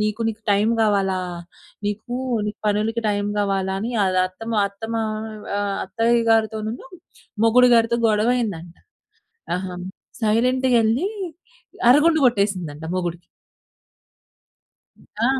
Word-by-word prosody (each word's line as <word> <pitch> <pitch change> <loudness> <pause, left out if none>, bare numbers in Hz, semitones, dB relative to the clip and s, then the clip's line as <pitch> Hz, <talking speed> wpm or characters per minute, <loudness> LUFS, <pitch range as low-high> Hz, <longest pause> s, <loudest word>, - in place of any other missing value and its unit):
"నీకు, 210 +1 -1
నీకు 220 0 -5
టైమ్ 205 +2 +3
గావాలా? 195 -3 +2 0.7
నీకూ 215 +4 -3 0.3
నీ 210 - -2
పనులుకి 215 +3 0
టైమ్ 205 0 0
గావాలా?" 195 -2 0
అని, 225 +4 -3
అది 185 -1 +2
అత్తమ 225 +5 -7 0.2
అత్తమావ్ 220 +1 -4 0.3
ఆహ్, 200 -1 -1
అత్తయ్య 230 +4 +1
గారితోనును, 220 +2 0 0.6
మొగుడు 250 +2 +6
గారుతో 230 +1 +3
గొడవయ్యిందంట. 210 -6 0 0.8
ఆహా! 185 -1 -5 0.5
సైలెంట్‌గెళ్ళి 240 - +2 0.8
అరుగుండు 315 +5 +5
కొట్టేసిందంట 185 -9 -1
మొగుడికి. 175 -1 -3 2.0
ఆ! - - +3
215 Hz, 95 wpm, -22 LUFS, 200-230 Hz, 2.0 s, మొగుడు